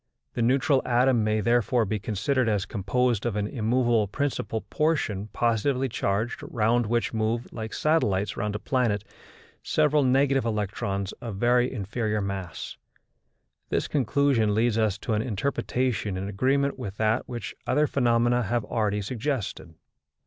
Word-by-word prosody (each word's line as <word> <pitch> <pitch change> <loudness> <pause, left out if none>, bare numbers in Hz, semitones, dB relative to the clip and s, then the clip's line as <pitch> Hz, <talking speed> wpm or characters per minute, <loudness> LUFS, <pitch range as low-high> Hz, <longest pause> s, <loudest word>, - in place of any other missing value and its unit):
The 120 - -2
neutral 130 +3 +3
atom 125 -1 +3
may 110 0 +1
therefore 120 +1 +2
be 105 +1 -2
considered 115 +5 0
as 105 -3 0
composed 115 +2 0
of 120 -4 -1
an 105 -1 0
immovable 120 -1 +1
principal 115 -1 -2
portion 135 -11 -1
positively 120 +5 0
charged, 110 +1 -1
round 120 0 +1
which 120 +1 0
move, 110 +2 -1
like 110 -1 -5
satellites 105 -11 +1
round 105 0 -2
a - - 0
planet, 110 -3 0 0.6
several 150 -1 +2
negative 135 0 +3
electrons 100 -3 -2
of 115 -4 -5
very 120 +4 +2
inferior 105 -1 -2
mass. 100 -3 -5 0.9
This - - 0
conclusion 130 -5 +2
leads 115 0 +2
us 110 -3 +1
to 110 - -3
an 105 - +1
interpretation 120 -2 -1
in 95 +1 -3
agreement 135 +7 0
with 105 -5 -6
that 110 +2 0
which 120 -1 -5
other 150 +4 +3
phenomena 120 -3 +2
have 120 +2 -1
already 105 -2 -1
suggested. 115 - -3
115 Hz, 140 wpm, -26 LUFS, 105-125 Hz, 0.9 s, neutral